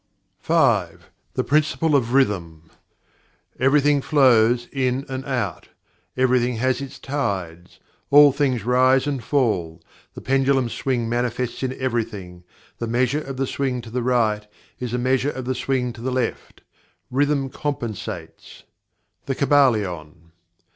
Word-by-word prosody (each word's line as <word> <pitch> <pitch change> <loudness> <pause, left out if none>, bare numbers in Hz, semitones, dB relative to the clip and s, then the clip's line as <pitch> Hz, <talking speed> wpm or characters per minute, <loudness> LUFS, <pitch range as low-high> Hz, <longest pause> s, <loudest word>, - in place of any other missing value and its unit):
5. - - +1 0.2
The - - 0
Principle 155 +1 +1
of 120 -4 +1
Rhythm 85 - 0 0.9
"Everything 145 +2 +3
flows, 120 -5 +4
out - - -28
and 130 0 -1
in; 130 - -3 0.6
everything 125 -1 +2
has 130 +3 0
its 135 -2 -8
tides; 95 - -4 0.3
all 145 0 +8
things 130 -5 -1
rise 130 +2 +3
and 140 -4 -3
fall; 95 - 0 0.4
the - - -7
pendulum 135 -1 +1
swing 120 -2 -2
manifests 120 +1 -2
in 130 -1 -3
everything; 110 -8 -3 0.4
the 115 - -3
measure 125 +5 +1
of 135 -3 -7
the 135 - 0
swing 130 -1 -2
to 115 -1 -11
the 125 +1 -2
right 110 -4 +1 0.3
is 125 -2 -4
the 125 - -1
measure 130 +2 +1
of 130 -3 -6
the 130 - -1
swing 125 -2 -1
to 115 - -12
the 130 - -2
left; 130 0 -3 0.5
rhythm 140 +1 +1
compensates." 125 -8 -6 0.6
The 135 - -1
Kybalion. 100 - +1
125 Hz, 135 wpm, -22 LUFS, 115-135 Hz, 0.9 s, all